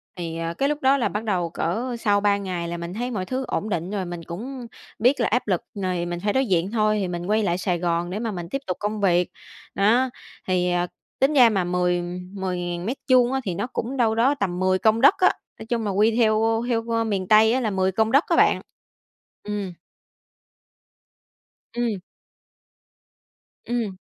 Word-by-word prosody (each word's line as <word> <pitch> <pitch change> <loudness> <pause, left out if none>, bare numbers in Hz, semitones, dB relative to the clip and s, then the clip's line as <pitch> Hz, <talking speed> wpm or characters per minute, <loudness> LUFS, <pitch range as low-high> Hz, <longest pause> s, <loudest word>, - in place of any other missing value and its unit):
Thì, 165 -2 -5
ờ, 165 0 -3
cái 275 +11 0
lúc 295 0 -2
đó 270 +1 +4
là 250 - 0
bắt 210 +2 -3
đầu 185 -6 -1
cỡ 230 +10 -2
sau 205 -2 +2
3 205 -1 +3
ngày 180 -4 -4
là 170 0 -4
mình 170 +1 -6
thấy 245 +4 -3
mọi 190 -5 -3
thứ 260 +5 -3
ổn 215 - -2
định 175 -1 -2
rồi 200 -3 -2
mình 175 -1 -6
cũng 240 +9 -7 0.3
biết 255 +5 +3
là 230 - +2
áp 245 +1 0
lực 185 -4 +1
rồi 185 -3 -2
mình 175 0 -4
phải 205 0 +1
đối 265 0 +2
diện 185 -2 0
thôi 215 -2 +2
thì 190 - -1
mình 175 -1 -4
quay 215 +3 +1
lại 175 -3 +1
Sài 180 -1 -1
Gòn 170 0 -1
để 190 +4 -3
mà 225 -1 -2
mình 175 -3 -6
tiếp 275 +7 -3
tục 180 - -2
công 210 0 -3
việc. 180 -2 +2 0.4
Đó, 235 +6 +3 0.4
thì 180 -1 +1 0.5
tính 275 +3 +3
ra 250 -5 +7
mà 195 -4 0
mười 180 0 0 0.3
10.000m2 190 +7 0
á 270 - +1
thì 185 -6 -3
nó 240 - -2
cũng 255 +1 -4
đâu 225 -3 +2
đó 255 +5 +3
tầm 185 -7 -2
10 185 0 +2
công 220 +2 +3
đất 280 - +7
á, 370 - +5 0.3
nói - - -8
chung 230 -1 -2
là 205 - 0
quy 215 +3 +3
theo 225 0 +2
theo 230 -1 0
miền 195 -4 -2
Tây 220 +2 +6
á 260 - +2
là 230 -4 0
10 190 -1 +1
công 220 +3 +1
đất 275 +5 +5
á - - +2
bạn. - - +4 0.8
Ừm. 205 -3 -4 2.0
Ừm. 235 -4 -1 1.7
Ừm. 230 -6 -2
205 Hz, 200 wpm, -24 LUFS, 180-235 Hz, 2.0 s, ra